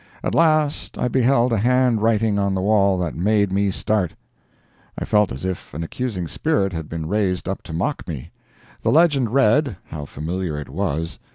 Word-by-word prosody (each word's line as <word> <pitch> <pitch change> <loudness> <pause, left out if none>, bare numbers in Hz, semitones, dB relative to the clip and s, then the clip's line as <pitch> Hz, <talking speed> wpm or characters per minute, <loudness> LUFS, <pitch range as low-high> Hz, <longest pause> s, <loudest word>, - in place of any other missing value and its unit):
At - - -1
last 155 -3 +2
I - - 0
beheld 125 -1 +3
a 110 - +2
hand 125 0 +2
writing 110 -2 +2
on 100 -1 0
the 95 - -1
wall 100 -1 +3
that 90 -3 -2
made 100 +2 +2
me 100 +1 +2
start! 95 -3 -1 0.8
I - - -3
felt 105 -3 +2
as 65 +8 -5
if 95 -5 -5
an 80 - -3
accusing 95 -1 -3
spirit 100 - 0
had 80 -2 -5
been 80 -1 -4
raised 95 -2 0
up 95 - -3
to 80 - -10
mock 100 - -2
me. 75 -7 -6 0.5
The - - 0
legend 145 -7 +4
read 135 - +3
(how 75 -2 -6
familiar 80 +2 -4
it 75 - -8
was!) 80 0 -3
100 Hz, 185 wpm, -22 LUFS, 85-120 Hz, 0.8 s, legend